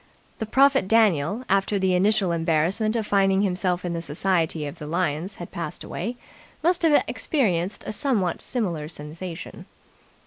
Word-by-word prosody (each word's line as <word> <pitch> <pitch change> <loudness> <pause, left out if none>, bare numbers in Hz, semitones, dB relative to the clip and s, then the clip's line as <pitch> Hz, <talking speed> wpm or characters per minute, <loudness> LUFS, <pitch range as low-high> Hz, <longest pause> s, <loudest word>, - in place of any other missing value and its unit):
The 220 - -3
prophet 270 -2 +4
Daniel, 210 - +3
after 195 +1 +1
the 190 -1 +1
initial 195 0 +2
embarrassment 170 +7 +1
of 225 -2 0
finding 195 -1 +3
himself 180 -2 0
in 175 - -2
the 170 - -3
society 160 0 0
of 145 - -7
the 150 - -7
lions 170 +3 -1
had 175 - -9
passed 170 -3 -5
away, 235 +7 -4 0.5
must 350 +1 +2
have 320 -3 +4
experienced 200 - 0
a - - -4
somewhat 215 - 0
similar 175 -12 -2
sensation. 165 +3 -8
185 Hz, 150 wpm, -24 LUFS, 170-215 Hz, 0.5 s, prophet